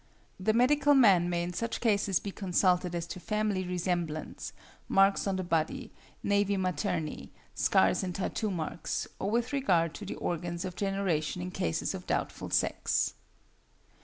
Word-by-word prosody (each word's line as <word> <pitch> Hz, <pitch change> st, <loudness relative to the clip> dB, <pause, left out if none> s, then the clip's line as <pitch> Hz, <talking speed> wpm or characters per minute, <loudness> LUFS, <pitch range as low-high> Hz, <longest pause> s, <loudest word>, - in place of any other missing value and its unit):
The 215 Hz, +4 st, +2 dB
medical 285 Hz, +5 st, +4 dB
man 195 Hz, -9 st, +6 dB
may 170 Hz, -1 st, 0 dB
in 175 Hz, +1 st, -4 dB
such 230 Hz, +5 st, -2 dB
cases 200 Hz, -5 st, +2 dB
be 200 Hz, -, -5 dB
consulted 180 Hz, -2 st, +1 dB
as 170 Hz, -1 st, -2 dB
to 185 Hz, -, -7 dB
family 210 Hz, -2 st, -1 dB
resemblance, 175 Hz, -3 st, -2 dB, 0.4 s
marks 195 Hz, +1 st, +4 dB
on 195 Hz, -, +1 dB
the 185 Hz, -, -2 dB
body, 165 Hz, -2 st, -1 dB, 0.3 s
nævi 200 Hz, 0 st, +2 dB
materni, 165 Hz, -4 st, -2 dB, 0.2 s
scars -, -, +3 dB
and 180 Hz, -2 st, -4 dB
tattoo 210 Hz, +2 st, -2 dB
marks, 170 Hz, -3 st, -3 dB
or 195 Hz, -, -1 dB
with 235 Hz, +4 st, 0 dB
regard 175 Hz, -, +2 dB
to 205 Hz, -, -8 dB
the -, -, -4 dB
organs 175 Hz, +1 st, -3 dB
of 180 Hz, -1 st, -5 dB
generation 195 Hz, -5 st, -1 dB
in 180 Hz, +1 st, -4 dB
cases 80 Hz, -, -1 dB
of -, -, -7 dB
doubtful -, -, -2 dB
sex. -, -, +1 dB
185 Hz, 155 wpm, -30 LUFS, 175-205 Hz, 0.4 s, man